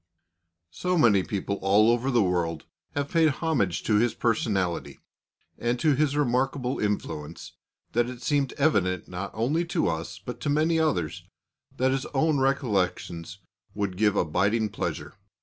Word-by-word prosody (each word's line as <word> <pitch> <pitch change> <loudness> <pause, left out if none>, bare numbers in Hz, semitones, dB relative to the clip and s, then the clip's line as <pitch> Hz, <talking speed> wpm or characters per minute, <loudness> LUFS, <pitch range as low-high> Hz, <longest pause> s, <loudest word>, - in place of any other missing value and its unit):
So 180 - -1
many 110 - +5
people 100 +1 -3
all 105 +4 +5
over 120 +3 0
the 120 -5 +3
world 85 -4 -1 0.3
have 145 0 -2
paid 165 -2 +4
homage 135 - 0
to 105 - +2
his 120 +2 +2
personality, 100 -6 -1 0.6
and 120 +1 0
to 155 +1 +3
his 145 +1 +1
remarkable 130 -1 0
influence, 80 -7 -3 0.4
that 120 +1 +1
it 125 -1 -9
seemed 140 -2 +1
evident 95 - +1
not 90 +2 -5
only 135 +10 +1
to 170 - 0
us 80 0 -4
but 110 +6 -8
to 150 - -1
many 160 +3 +2
others, 90 - -1 0.5
that 130 +1 +2
his 135 0 -1
own 155 +1 +2
recollections 100 - -1 0.3
would 100 -3 -2
give 105 +1 +2
abiding 100 +6 +1
pleasure. - - -4
115 Hz, 150 wpm, -26 LUFS, 95-140 Hz, 0.6 s, many